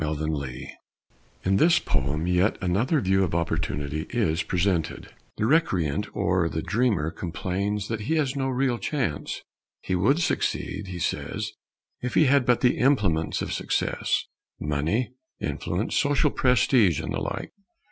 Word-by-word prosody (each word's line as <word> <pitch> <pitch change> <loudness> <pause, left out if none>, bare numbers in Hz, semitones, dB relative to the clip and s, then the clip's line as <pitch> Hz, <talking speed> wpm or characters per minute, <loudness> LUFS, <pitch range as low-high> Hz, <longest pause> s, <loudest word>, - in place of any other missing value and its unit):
_ - - 0
OPPORTUNITY 75 -4 -3 0.7
In 95 +1 +2
this 170 - +5
poem 70 +4 -1
yet 90 +4 +2
another 105 - +1
view 95 -1 +2
of 85 -2 -1
opportunity 75 -2 -2
is 95 -8 +1
presented. 90 -3 -1 0.2
The 110 - 0
recreant 95 - +2
or 90 -2 +1
the 80 - -3
dreamer 105 -9 +1
complains 95 +5 -3
that 115 -1 -2
he 140 +10 0
has 145 -4 0
no 135 -1 0
real 130 -2 0
chance. 125 - -2 0.4
He 95 - -3
would 105 - +3
succeed, 105 - -1
he 90 -1 -6
says, 105 +4 -2 0.5
if 125 - -3
he 155 - +6
had 135 -2 +3
but 125 -1 +3
the 125 - +3
implements 105 - +2
of - - -3
success - - 0 0.3
money, 75 - 0 0.3
influence, 90 +6 -2
social 145 -2 +3
prestige, 120 - +3
and - - -4
the - - -1
like. - - -4
95 Hz, 145 wpm, -26 LUFS, 80-125 Hz, 0.7 s, he